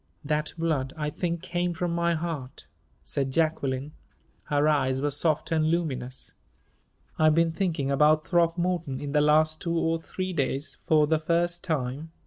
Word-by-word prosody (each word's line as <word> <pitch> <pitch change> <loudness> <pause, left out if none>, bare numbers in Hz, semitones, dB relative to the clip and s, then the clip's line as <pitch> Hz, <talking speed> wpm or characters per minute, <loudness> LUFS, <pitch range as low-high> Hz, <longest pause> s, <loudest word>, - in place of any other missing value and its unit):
"That 150 +1 -1
blood, 150 -5 -1
I 150 -1 -2
think, 170 +1 -3
came 175 0 -1
from 175 0 -1
my 170 0 +1
heart," 155 -6 -5 0.4
said 135 -1 -1
Jacqueline; 140 -2 0 0.5
her 145 0 +2
eyes 135 -3 +2
were 145 +1 0
soft 155 +2 +1
and 160 -1 +2
luminous. 130 -7 -2 0.9
"I've 155 -1 +5
been 165 0 +3
thinking 160 -6 -1
about 150 +2 +4
Throckmorton 170 -4 +1
in 145 0 -5
the 150 0 +3
last 155 +1 +3
two 170 -1 -1
or 165 0 0
three 185 +2 -4
days 140 -1 -2
for 155 -1 +5
the 155 +1 +1
first 170 +2 0
time. 150 -1 -3
155 Hz, 155 wpm, -27 LUFS, 145-170 Hz, 0.9 s, I've